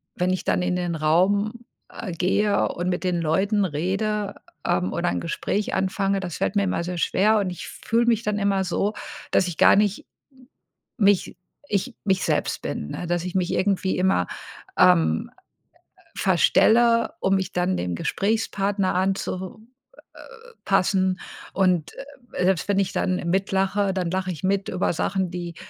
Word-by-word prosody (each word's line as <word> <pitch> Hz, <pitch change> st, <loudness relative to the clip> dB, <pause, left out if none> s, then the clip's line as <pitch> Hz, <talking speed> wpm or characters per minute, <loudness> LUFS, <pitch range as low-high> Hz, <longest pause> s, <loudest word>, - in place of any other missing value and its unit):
wenn 180 Hz, +1 st, 0 dB
ich 185 Hz, -2 st, -2 dB
dann -, -, +1 dB
in 180 Hz, 0 st, 0 dB
den 175 Hz, -2 st, -2 dB
Raum, 185 Hz, +7 st, +2 dB, 0.4 s
äh, 195 Hz, -, -7 dB
gehe 200 Hz, +4 st, +1 dB
und 175 Hz, +1 st, -3 dB
mit 180 Hz, -, -2 dB
den 180 Hz, -2 st, 0 dB
Leuten 195 Hz, +6 st, +1 dB
rede, 195 Hz, +6 st, -2 dB, 0.3 s
ähm, 90 Hz, +1 st, +1 dB
oder -, -, 0 dB
ein 85 Hz, 0 st, -1 dB
Gespräch 200 Hz, +5 st, -2 dB
anfange, 195 Hz, +1 st, 0 dB
das 180 Hz, -4 st, -5 dB
fällt 200 Hz, -, -1 dB
mir 200 Hz, -, +3 dB
immer 185 Hz, -3 st, -1 dB
sehr 180 Hz, 0 st, -4 dB
schwer 210 Hz, +5 st, +2 dB
und 195 Hz, -2 st, -1 dB
ich 180 Hz, -, -7 dB
fühle 230 Hz, +1 st, 0 dB
mich 230 Hz, -1 st, +2 dB
dann 210 Hz, -1 st, -1 dB
immer 200 Hz, -1 st, +1 dB
so, 200 Hz, +3 st, -1 dB, 0.4 s
dass 185 Hz, -, +3 dB
ich 170 Hz, -, -5 dB
gar -, -, +6 dB
nicht 205 Hz, +2 st, +2 dB, 1.0 s
m 210 Hz, -, +2 dB
mich 200 Hz, -2 st, +2 dB, 0.4 s
ich 215 Hz, +5 st, -1 dB
mich 190 Hz, -2 st, +1 dB
selbst -, -, -1 dB
bin, 75 Hz, -, -4 dB
ne? 175 Hz, -, -5 dB
Dass 175 Hz, 0 st, -1 dB
ich 180 Hz, -1 st, -5 dB
mich 180 Hz, -2 st, 0 dB
irgendwie 190 Hz, -1 st, 0 dB
immer, 180 Hz, -, +2 dB, 0.5 s
ähm, 80 Hz, -1 st, +4 dB, 0.7 s
äh, -, -, -24 dB, 0.2 s
verstelle, 230 Hz, 0 st, +4 dB
um 195 Hz, 0 st, +2 dB
mich 190 Hz, -1 st, -2 dB
dann 180 Hz, +1 st, 0 dB
dem 90 Hz, -1 st, -2 dB
Gesprächspartner 200 Hz, -, -1 dB
anzu 190 Hz, 0 st, -2 dB, 0.5 s
äh -, -, -16 dB
äh, 470 Hz, 0 st, -14 dB
passen 190 Hz, -1 st, +2 dB, 0.3 s
und, 180 Hz, -5 st, +1 dB, 0.4 s
äh, 180 Hz, -, 0 dB
selbst 185 Hz, -2 st, +1 dB
wenn 200 Hz, -1 st, +2 dB
ich 195 Hz, -1 st, 0 dB
dann 185 Hz, -1 st, 0 dB
mit 190 Hz, +2 st, 0 dB
lache, 195 Hz, +1 st, +1 dB
dann 180 Hz, -3 st, -2 dB
lache 185 Hz, 0 st, -1 dB
ich 160 Hz, -, -8 dB
mit 195 Hz, +1 st, 0 dB
über 185 Hz, -1 st, 0 dB
Sachen, 190 Hz, +2 st, -1 dB
die 175 Hz, -1 st, -6 dB
190 Hz, 175 wpm, -24 LUFS, 180-200 Hz, 1.0 s, gar